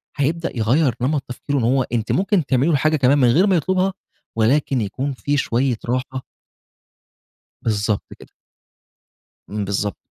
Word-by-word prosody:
هيبدأ 155 0 -1
يغير 125 +4 +2
نمط 140 +2 0
تفكيره 140 +3 -3
إن 125 - 0
هو 130 +3 +2
أنتِ 115 -3 -2
ممكن 190 -4 +1
تعملي 135 +4 +2
له 160 - +3
حاجة 155 +3 +2
كمان 135 +1 +3
من 130 -3 +4
غير 165 - +4
ما 190 - +3
يطلبها، 185 +3 +1 0.4
ولكن 130 +2 +2
يكون 130 +7 -3
في 145 +3 -1
شويّة 125 -1 0
راحة 130 +2 -3 1.4
بالضبط 105 -1 0 0.2
كده. - - -14 1.2
امم. 105 0 -3
بالضبط. 100 0 -2
135 Hz, 150 wpm, -21 LUFS, 115-150 Hz, 1.4 s, من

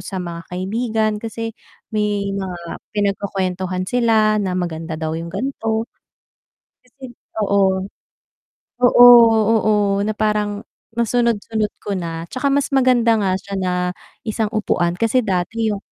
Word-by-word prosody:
sa 195 - -7
mga 170 -2 -5
kaibigan 215 +4 -1
kasi 225 0 -5 0.4
may 205 -2 -1
mga 190 -2 -4 0.4
pinagkukuwentuhan 190 -2 -1
sila 220 -2 +2
na 185 -2 -2
maganda 165 -2 -3
daw 160 -1 -3
yung 165 +1 -4
gan'to, 225 0 -2 1.0
tas 250 - -28
yun 245 -2 -10 0.2
oo, 195 -2 +1 0.9
oo, 245 0 +7 0.6
oo, 205 -2 +2
na 215 +1 -1
parang 210 -1 -1 0.3
nasunod-sunod 230 -2 0 0.2
ko 205 - -3
na, 165 -3 -4
'tsaka 270 +2 -1
mas 280 +1 +1
maganda 250 -3 +4
nga 195 -2 +1
siya 200 +1 -7
na 185 - 0 0.5
isang 220 0 -1
upuan 175 -5 0
kasi 230 +3 +2
dati 215 +2 -1
yung 205 - -1
205 Hz, 130 wpm, -20 LUFS, 185-225 Hz, 1.0 s, oo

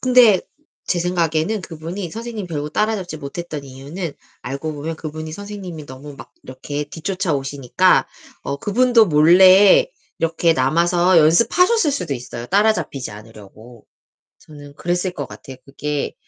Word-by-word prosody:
근데 245 -6 +5 0.5
제 175 - 0
생각에는 175 +3 0
그분이 170 +2 -7
선생님 225 -2 -6
결국 150 -2 -5
따라잡지 210 -5 -1
못했던 150 +1 -6
이유는 140 +5 -7 0.3
알고 140 +5 -4
보면 155 +2 -5
그분이 155 0 -7
선생님이 190 -5 -8
너무 140 +2 -10
막 - - -13
이렇게 145 +3 -6
뒤쫓아오시니까 145 - 0 0.4
어 140 - -3
그분도 230 - +3
몰래 185 +5 +6 0.3
이렇게 165 0 +1
남아서 170 +6 +2
연습하셨을 295 - +3
수도 180 - -3
있어요, 120 -1 -7
따라잡히지 200 - 0
않으려고. 110 +2 -14 0.5
저는 145 -2 -13
그랬을 175 +3 -2
것 - - -5
같아요. 135 - -11
그게 145 +1 -4
165 Hz, 335 characters per minute, -20 LUFS, 145-190 Hz, 0.5 s, 몰래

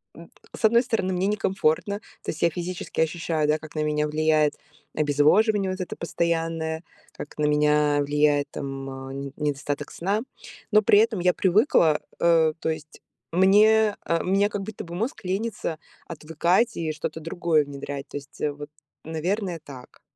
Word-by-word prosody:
н - - -13 0.3
с 225 - 0
одной 235 +2 +5
стороны, 220 -6 -1
мне 185 +2 0
некомфортно, 195 -2 0 0.3
то - - -2
есть 160 - -9
я 170 - +4
физически 175 +1 -5
ощущаю, 160 -1 0
да, 150 +1 +2
как 155 0 -12
на 155 - 0
меня 150 0 0
влияет 155 0 +2 0.4
обезвоживание 185 +8 +3
вот 185 +1 -4
это 180 - -5
постоянное, 165 -1 -2 0.3
как 145 - -9
на 150 - +1
меня 150 0 +3
влияет 145 0 +2
там, 135 -1 -5
а, 135 0 -7
не 140 0 -6
недостаток 145 -1 -3
сна. 200 +5 -1 0.5
Но 215 0 +6
при 205 0 +5
этом 225 -2 +2
я 180 0 +3
привыкла, 180 - +3 0.2
э, 165 -2 +4
то - - -2
есть 155 -1 -6 0.3
мне 210 +3 +5
а, 165 0 +1
у - - -6
меня 195 +2 +3
как 205 -2 -4
будто 215 +1 -7
бы 170 - -8
мозг 225 +6 -3
лениться 190 -3 -2 0.3
отвыкать 170 +8 0
и 160 -2 -1
что-то 155 +1 -5
другое 165 -2 +1
внедрять. 140 0 -6
То - - -12
есть, 140 -1 -12
э, 150 - +1
вот, 145 +1 -9 0.3
наверное, 175 +3 -2
так. 130 -4 -13
165 Hz, 170 wpm, -25 LUFS, 150-190 Hz, 0.5 s, Но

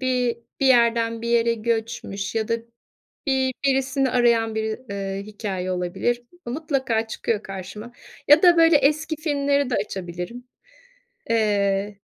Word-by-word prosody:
bi 250 -2 0 0.2
bir 270 - +3
yerden 230 -2 +3
bir 235 - -3
yere 235 0 +3
göçmüş 225 -3 -3
ya 220 -1 -1
da 230 - +2 0.7
bi 265 -1 +2 0.2
birisini 270 0 +1
arayan 230 -2 +2
biri, 220 0 -2
ııı, 195 0 -4
hikâye 200 -3 -4
olabilir. 185 +7 -1 0.2
Mutlaka 260 -4 -1
çıkıyor 220 -1 -2
karşıma 195 +5 -8 0.4
ya 295 +4 +7
da, 350 -1 +7
böyle, 330 -1 +6
eski 305 +3 +1
filmleri 285 -3 0
de - - 0
açabilirim. 185 +4 -5 0.9
Eee, 205 -2 +1
230 Hz, 130 wpm, -23 LUFS, 210-265 Hz, 0.9 s, ya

